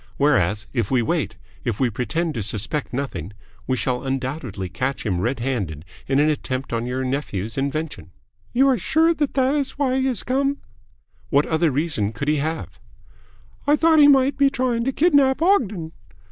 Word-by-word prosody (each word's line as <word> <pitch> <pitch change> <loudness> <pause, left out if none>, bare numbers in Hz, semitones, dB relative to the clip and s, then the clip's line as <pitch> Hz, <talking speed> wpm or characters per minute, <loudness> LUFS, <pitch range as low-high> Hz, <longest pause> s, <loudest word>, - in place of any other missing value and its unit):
Whereas, 105 - +2
if 115 -6 -1
we 125 -3 +2
wait, - - -1 0.3
if 115 -4 -2
we 125 -3 +2
pretend 160 +9 -2
to 115 - -3
suspect 110 +8 -2
nothing, 125 - -4 0.3
we 130 - 0
shall 125 -1 -1
undoubtedly 130 - -3
catch 125 +11 -3
him 90 -5 0
red 120 +4 -1
handed 95 - -3 0.2
in 135 - +1
an 150 - +4
attempt 135 -4 -2
on 115 +1 -1
your 130 +1 -2
nephew's 115 -6 -3
invention." 140 - -3 0.4
"You 265 +3 +4
are 255 -4 +2
sure 320 - +3
that 295 -5 -2
that 265 0 +3
is 285 -2 -2
why 265 -2 +1
he 265 - +1
has 255 -4 -1
come?" 275 +2 0 0.7
"What 145 -1 +3
other 160 0 +2
reason 140 -7 -1
could 140 +8 -3
he 150 - +2
have?" 160 +3 -4 0.9
"I 295 - +6
thought 320 0 +4
he 290 - +8
might 275 -1 +4
be 280 -1 +5
trying 250 -3 -1
to 270 - +1
kidnap 285 -3 +3
Ogden." 215 - +1
145 Hz, 180 wpm, -22 LUFS, -, 0.9 s, he